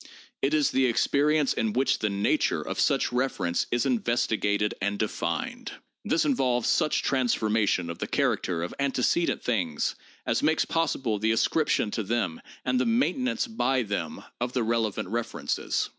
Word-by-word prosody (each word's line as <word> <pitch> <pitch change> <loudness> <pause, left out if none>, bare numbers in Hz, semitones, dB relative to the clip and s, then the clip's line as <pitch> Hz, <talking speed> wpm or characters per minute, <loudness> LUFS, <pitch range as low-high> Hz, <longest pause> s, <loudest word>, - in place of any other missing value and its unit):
It 140 +3 +2
is 150 -2 +2
the 130 -1 +3
experience 145 +4 +2
in 110 -1 -1
which 130 +2 +1
the 110 - 0
nature 100 0 +1
of - - -5
such - - +2
reference 125 -9 0
is 120 - 0
investigated 110 - +1
and 100 +1 -1
denned. 110 0 -3 0.3
This 160 - +1
involves 125 -4 +1
such 155 -3 +2
transformation 110 -8 +1
of 85 0 -6
the - - -3
character 85 -2 0
of 85 - -4
ante 135 -2 0
cedent 170 +6 +1
things 90 -11 0 0.3
as - - +1
makes 155 +1 +2
possible 130 -9 0
the 110 +2 +2
ascription 115 -1 +1
to 110 - -2
them 105 -6 -2 0.2
and 255 - +1
the - - +1
main 235 +4 +2
tenance 260 0 -1
by 135 - 0
them 100 -7 -4 0.2
of 120 +1 -2
the 125 - +1
relevant 115 -4 -1
references. 115 +3 -2
120 Hz, 160 wpm, -27 LUFS, 105-140 Hz, 0.3 s, the